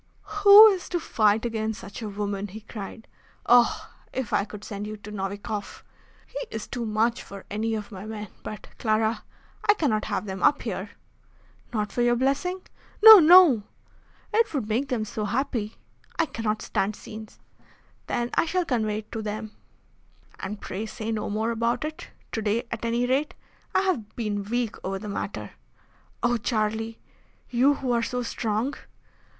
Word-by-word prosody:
"Who 405 +1 +11
is 380 -3 -2
to 350 - 0
fight 220 -6 +2
against 220 -2 -2
such 200 +4 -9
a 215 - -4
woman?" 200 0 -3
he 210 +3 -9
cried. 215 +1 -9 0.4
"Oh! 245 0 +4 0.2
if 260 -4 -4
I 200 - +2
could 210 -1 -10
send 205 0 -5
you 215 0 -6
to 210 0 -10
Novikoff! 200 +1 -5 0.4
He - - -7
is 220 - -5
too 240 -3 -4
much 225 +3 +1
for 200 -1 -10
any 220 +2 -1
of 210 0 -6
my 195 +1 -8
men. 210 -2 -6
But, 215 - -8
Clara, 220 0 +1 0.5
I 420 - +8
cannot 245 - 0
have - - -2
them 190 -2 -5
up 290 - +3
here." 200 -3 -4 0.8
"Not 210 -3 -2
for 245 - -1
your 240 0 +4
blessing?" 280 +9 0 0.4
"No, 440 -2 +13
no!" 330 - +8 0.7
"It 455 +1 +3
would 255 -7 -1
make 235 +6 0
them 230 -4 -1
so 215 0 -4
happy." 230 -2 -2 0.4
"I 330 - +3
cannot 225 -6 -3
stand 200 +2 -1
scenes." 215 0 -10 0.7
"Then 240 0 -1
I - - +2
shall 360 +1 0
convey 220 -7 0
it 215 - -29
to 225 - -4
them." 215 0 -5 0.9
"And 200 +2 -5
pray 210 +4 -5
say 220 +1 -5
no 215 -1 -2
more 220 +2 -1
about 235 +4 0
it 310 0 -6 0.2
to 225 - -2
day, 215 +3 0
at 230 - -4
any 235 +1 +1
rate. 270 +4 0 0.4
I - - +5
have 325 - -2
been 205 -3 -2
weak 235 +1 -2
over 195 +1 -2
the 210 +1 -7
matter." 200 - -4 0.7
"Oh! 240 0 +3
Charlie, 220 0 -1 0.5
you 260 +4 +4
who 260 -2 -2
are 235 -1 +2
so 250 +1 -2
strong!" 230 +3 -1
220 Hz, 170 wpm, -26 LUFS, 210-245 Hz, 0.9 s, No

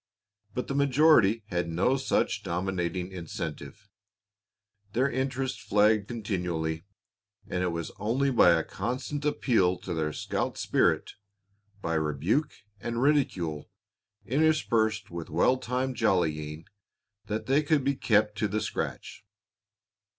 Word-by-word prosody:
But 125 - -2
the - - -2
majority 140 -6 +4
had 85 -2 -1
no 90 +11 +2
such 135 0 0
dominating 90 0 -2
incentive. 85 0 -7 1.1
Their 130 +4 +2
interest 130 0 -2
flagged 105 0 +3
continually, 90 -7 -3 0.6
and 90 - -2
it 90 - +1
was 85 -2 -3
only 125 +7 +1
by 115 -7 +6
a 80 -1 +1
constant 130 +8 -4
appeal 110 -11 +2
to 90 - -5
their 80 -2 -1
scout - - -3
spirit, - - +1 0.7
by 80 - -1
rebuke 80 - 0 0.3
and 115 +3 -3
ridicule, 110 - +1 0.6
interspersed 115 - +1
with 85 -1 -6
well 105 +11 +3
timed 130 +1 -2
jollying, 80 -7 0 0.6
that 110 +1 -3
they 135 +5 +3
could 150 -2 +2
be 140 +1 +2
kept 105 -5 +2
to 105 - +2
the 105 +2 -1
scratch. 100 - -4
105 Hz, 120 wpm, -28 LUFS, 85-130 Hz, 1.1 s, by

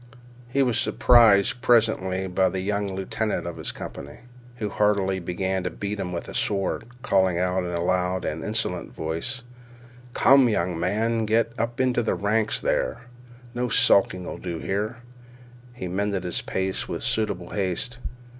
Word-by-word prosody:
He 135 +2 +2
was 125 -3 +1
surprised 115 -1 +5
presently 100 -5 +2
by 95 0 +2
the 95 +1 -3
young 100 0 -2
lieutenant 100 +2 -2
of 85 - -5
his - - -2
company, 70 - -9 0.3
who 110 -3 -3
began - - -11
heartily 100 -2 +2
to 95 +2 -2
beat 100 0 -5
him 90 - -3
with 85 - -5
a - - -8
sword, 100 +2 -1 0.2
calling 95 -8 +2
out 90 +1 0
in 90 - -3
a 85 -1 -2
loud 90 +1 0
and 80 +1 -3
insolent 105 -5 -2
voice: 80 +11 -4 0.7
"Come, 135 -2 +6
young 90 -5 -1
man, 110 +6 0
get 115 +1 +2
up 115 +1 -2
into 130 -2 +2
ranks 110 +2 0
there. - - -1 0.5
No 125 0 -1
skulking 90 -4 +3
'll - - -6
do 85 -2 -4
here." 105 +7 -2 0.7
He 120 -7 -6
mended 100 +1 -1
his 90 -2 -1
pace 95 0 -2
with - - -4
suitable 110 -1 -1
haste. 100 +5 -2
100 Hz, 155 wpm, -25 LUFS, 90-115 Hz, 0.7 s, Come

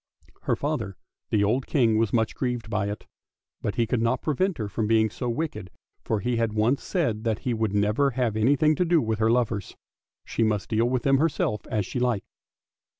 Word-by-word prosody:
Her - - +2
father, 115 - -3 0.3
the 105 -2 +2
old 120 +6 +1
King, 115 -6 +3
was 110 -2 +1
much 115 -2 +1
grieved 120 -3 -3
by 100 -1 0
it, 105 - -6 0.6
but 105 - -2
he 115 - +2
could 115 +1 0
not 115 +3 0
prevent 170 +4 0
her 110 - -3
from 105 +2 -2
being 110 -1 +3
so 125 +1 -3
wicked, 115 - -3 0.3
for 110 -2 -1
he 120 +3 0
had 115 -2 0
once 110 +6 +2
said 120 - -1
that 110 -3 0
he 125 - +1
would 110 -3 -1
never 105 +7 +2
have 120 -4 -1
anything 140 +7 +3
to - - +3
do 170 -1 +4
with 110 -5 -1
her 110 0 +3
lovers; 115 -4 0 0.5
she - - -3
must 110 -3 +1
deal 115 +1 +2
with 125 -1 0
them 135 -1 +4
herself 145 -9 0
as 105 -3 -1
she 125 - -4
liked. 120 -5 0
115 Hz, 210 wpm, -26 LUFS, 105-130 Hz, 0.6 s, do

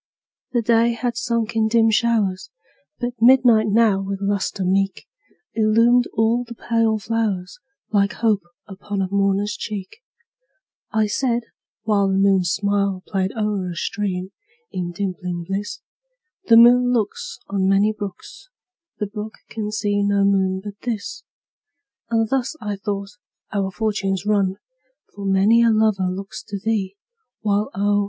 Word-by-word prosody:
The 240 -2 +1
day 230 +1 +3
had 240 +1 -2
sunk 235 -1 -1
in 220 -1 +3
dim 225 0 +3
showers, 215 -5 +1 0.5
But 245 -1 -3
midnight 240 -3 +6
now, 210 -2 +3
with 195 0 -3
lustre 200 -1 -1
meet. 195 +1 0 0.5
Illumined 230 +3 +4
all 225 +3 +2
the 235 0 -10
pale 230 -1 +1
flowers, 210 -4 -2 0.3
Like 200 -1 +2
hope 220 -3 +1 0.3
upon 200 0 -4
a 185 - -3
mourner's 200 +1 +1
cheek. 205 - -6 0.9
I 220 -2 +2
said 235 +2 0 0.4
(while 205 -2 +2
The 190 0 +1
moon's 195 -3 +3
smile 200 -1 0
Played 190 -1 -1
o'er 210 -4 -1
a 175 - -6
stream, 190 0 -3 0.4
in 175 -1 -3
dimpling 180 -2 -4
bliss,) 195 +4 -4 0.6
"The 230 - +6
moon 245 +1 +7
looks 215 -4 -2
"On 195 -1 +1
many 200 +2 +3
brooks, 205 - -9 0.5
"The 210 - -2
brook 210 +1 -7 0.2
can 215 -2 -4
see 205 -1 0
no 200 0 +2
moon 190 -1 +2
but 205 -1 -8
this;" 230 -4 -4 0.9
And 225 -1 +1
thus, 265 +4 -1
I 210 -2 -3
thought, 200 -1 -4 0.4
our 195 -2 0
fortunes 195 -1 -2
run, 200 -3 +1 0.6
For 200 -1 -7
many 200 +4 +4
a 235 - +5
lover 215 -4 +2
looks 195 +2 -6
to 200 - -4
thee, 200 -2 -1 0.5
While 205 -1 0
oh! 205 +1 +2
205 Hz, 145 wpm, -21 LUFS, 195-225 Hz, 0.9 s, moon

